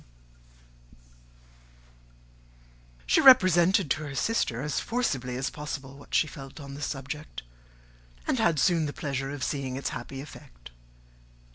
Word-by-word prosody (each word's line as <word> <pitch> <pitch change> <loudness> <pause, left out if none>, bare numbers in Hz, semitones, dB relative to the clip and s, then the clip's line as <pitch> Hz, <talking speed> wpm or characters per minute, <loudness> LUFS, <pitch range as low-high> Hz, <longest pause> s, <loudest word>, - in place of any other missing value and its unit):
She - - +4
represented 185 - +6
to 155 - +1
her 140 -2 -7
sister, 135 - 0
as 150 -1 -1
forcibly 135 - -2
as 135 +1 -2
possible, 140 -2 -6
what 140 - -7
she - - +4
felt 135 0 -10
on 140 -1 -9
the 140 - -8
subject, 140 - -5 0.8
and - - 0
had 165 -2 +3
soon 160 +3 +3
the 145 - -5
pleasure 135 -2 -3
of 140 -2 -5
seeing 135 -3 -2
its 135 - -2
happy 135 - -7
effect. - - -12
140 Hz, 130 wpm, -28 LUFS, 135-155 Hz, 0.8 s, represented